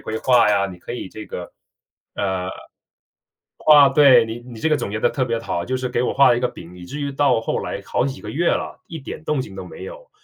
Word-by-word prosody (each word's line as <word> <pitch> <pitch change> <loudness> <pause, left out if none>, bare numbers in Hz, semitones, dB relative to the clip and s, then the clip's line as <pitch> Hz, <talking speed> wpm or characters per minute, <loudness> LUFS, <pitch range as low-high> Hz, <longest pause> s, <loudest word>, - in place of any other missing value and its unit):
规 110 - -5
划 120 -4 +4
呀，” 100 -1 +2
你 90 - -12
可 - - -8
以 120 - -6
这 110 +3 -9
个 90 - -7 0.6
呃 95 -2 -2 1.2
啊 145 -2 +8
对， 135 -4 +6
你 115 +1 -6
你 120 -1 -11
这 160 - +1
个 155 - +3
总 100 - -4
结 110 +1 -3
得 - - +3
特 130 - -1
别 115 -2 -1
好， 85 -6 -3
就 130 - -3
是 130 0 -3
给 125 -1 -1
我 - - 0
画 140 0 +5
了 120 - +4
一 - - -2
个 125 - +1
饼， 85 +1 -12
以 90 - -10
至 145 +12 -7
于 140 -1 -2
到 135 -4 +2
后 - - -2
来 - - -5
好 - - 0
几 135 0 -4
个 - - -9
月 170 +4 0
了， - - -3
一 165 - -7
点 150 +3 -8
动 150 -3 0
静 115 -7 -7
都 95 - -6
没 90 - -10
有。 - - -11
125 Hz, 280 characters per minute, -21 LUFS, 105-140 Hz, 1.2 s, 啊